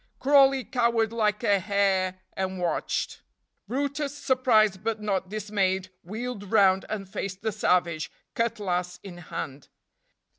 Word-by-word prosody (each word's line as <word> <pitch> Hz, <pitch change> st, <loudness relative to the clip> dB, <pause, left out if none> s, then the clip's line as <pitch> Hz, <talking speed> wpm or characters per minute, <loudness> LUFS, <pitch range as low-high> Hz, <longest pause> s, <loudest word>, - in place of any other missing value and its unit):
Crawley 270 Hz, -1 st, +5 dB
cowered 235 Hz, -3 st, +1 dB
like 215 Hz, -1 st, +1 dB
a 200 Hz, -3 st, +4 dB
hare 190 Hz, -1 st, +1 dB
and 190 Hz, 0 st, -3 dB
watched. 175 Hz, -2 st, -2 dB, 0.5 s
brutus, 285 Hz, +2 st, -2 dB
surprised 220 Hz, -8 st, +3 dB
but 225 Hz, -1 st, -1 dB
not 195 Hz, -3 st, -1 dB
dismayed, 190 Hz, -3 st, -1 dB
wheeled 215 Hz, +1 st, -6 dB
round 195 Hz, -3 st, +4 dB
and 205 Hz, -3 st, -4 dB
faced 195 Hz, -1 st, -5 dB
the 220 Hz, -, 0 dB
savage, 175 Hz, -6 st, +1 dB, 0.2 s
cutlass 185 Hz, -6 st, -1 dB
in 180 Hz, -3 st, -9 dB
hand. 140 Hz, -4 st, -6 dB
205 Hz, 120 wpm, -27 LUFS, 185-230 Hz, 0.5 s, Crawley